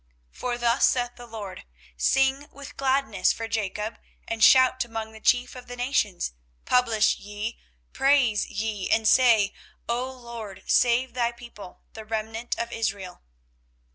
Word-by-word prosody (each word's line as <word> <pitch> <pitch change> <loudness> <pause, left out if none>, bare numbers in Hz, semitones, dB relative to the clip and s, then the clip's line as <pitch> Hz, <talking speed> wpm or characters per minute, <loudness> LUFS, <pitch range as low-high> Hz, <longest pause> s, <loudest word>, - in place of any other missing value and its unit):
24:031:007 - - -23
For 245 -1 -2
thus 240 +1 +3
saith 245 -1 0
the 245 0 -12
LORD; 210 -5 -8 0.3
Sing 270 - +2
with 280 -1 -11
gladness 270 -5 +1
for 225 - -4
Jacob, 215 0 -3 0.3
and 230 -1 -1
shout 260 0 +6
among 225 -2 -6
the 220 - -12
chief 245 +2 +1
of 250 -1 -10
the 245 - -7
nations: 230 - -1 0.3
publish 230 -4 +3
ye, 210 +3 -6 0.3
praise 270 -6 +3
ye, 210 -2 -3
and 220 -1 +2
say, 225 -5 +5 0.3
O 245 +2 -2
LORD, 235 -6 -9
save 245 +1 +2
thy 240 -1 0
people, 235 -6 -12
the 220 - -8
remnant 220 +2 -4
of 235 0 -3
Israel. 200 -6 -4
235 Hz, 145 wpm, -25 LUFS, 215-250 Hz, 0.3 s, shout